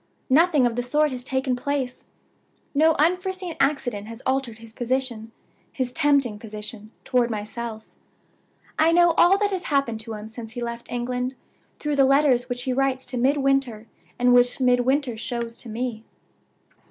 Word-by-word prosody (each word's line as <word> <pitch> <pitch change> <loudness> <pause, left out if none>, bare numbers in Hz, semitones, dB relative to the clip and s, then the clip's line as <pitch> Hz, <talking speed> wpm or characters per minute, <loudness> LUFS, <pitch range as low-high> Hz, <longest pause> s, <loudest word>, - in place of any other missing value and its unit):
"Nothing 305 -2 +5
of 235 -1 0
the 245 - 0
sort 295 +4 +1
has 250 -1 -5
taken 260 0 -1
place. 260 0 -3 0.7
No 315 +2 +4
unforeseen 365 +2 0
accident 250 -7 0
has 230 +2 -10
altered 260 -4 -1
his 225 0 -12
position 240 -2 -2 0.4
his 255 -2 -2
tempting 275 -8 +2
position 215 0 -8
toward 250 -2 +1
myself. 220 +1 -5 0.9
I 320 +1 +5
know 345 0 +6
all 350 +3 +5
that 410 0 0
has 370 -3 -3
happened 275 -6 0
to 220 0 -6
him 210 0 -8
since 225 0 -9
he 245 - -4
left 235 0 -6
England, 250 +1 -2 0.4
through 295 -1 -2
the 275 - +6
letters 265 -2 +3
which 245 0 -3
he 255 - -1
writes 265 0 0
to 250 0 -5
Midwinter, 270 -3 +1 0.3
and 245 0 +4
which 245 +1 +4
Midwinter 250 0 +2
shows 235 0 -4
to 240 - -6
me. 225 0 -4
250 Hz, 160 wpm, -24 LUFS, 235-280 Hz, 0.9 s, know